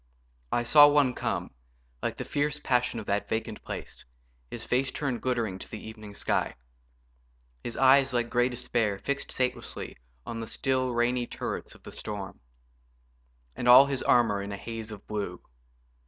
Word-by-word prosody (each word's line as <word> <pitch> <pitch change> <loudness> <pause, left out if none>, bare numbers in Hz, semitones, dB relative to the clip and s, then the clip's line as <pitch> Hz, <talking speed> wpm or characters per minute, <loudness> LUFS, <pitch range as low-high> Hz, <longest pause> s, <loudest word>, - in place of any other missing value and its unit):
I 120 - +1
saw 145 +4 +8
one 145 -3 +4
come, - - -2 0.5
Like - - -2
the - - -4
fierce 145 +1 0
passion 125 -4 +1
of 110 - -7
that 100 +1 -1
vacant 110 -1 -3
place, - - -7 0.5
His - - -5
face 130 +2 +1
turned 135 -6 -2
glittering 115 -7 -1
to - - -10
the 110 - -8
evening 110 -2 -10
sky; - - 0 1.1
His 120 - -5
eyes, 135 0 +6
like 120 -2 0
grey 120 +1 +3
despair, 120 -4 -1
fixed 140 +7 -3
satelessly 130 -1 -3 0.3
On 115 - -5
the 115 - -5
still, 130 0 0
rainy 120 +1 +1
turrets - - -5
of - - -19
the - - -9
storm; 105 -3 -6 1.2
And 120 - -3
all 125 +3 +10
his 140 -2 -2
armour 115 -5 +3
in 100 +1 -5
a 100 - -4
haze 115 +2 -6
of 105 -2 -9
blue. 100 -4 -4
120 Hz, 165 wpm, -28 LUFS, 110-130 Hz, 1.2 s, all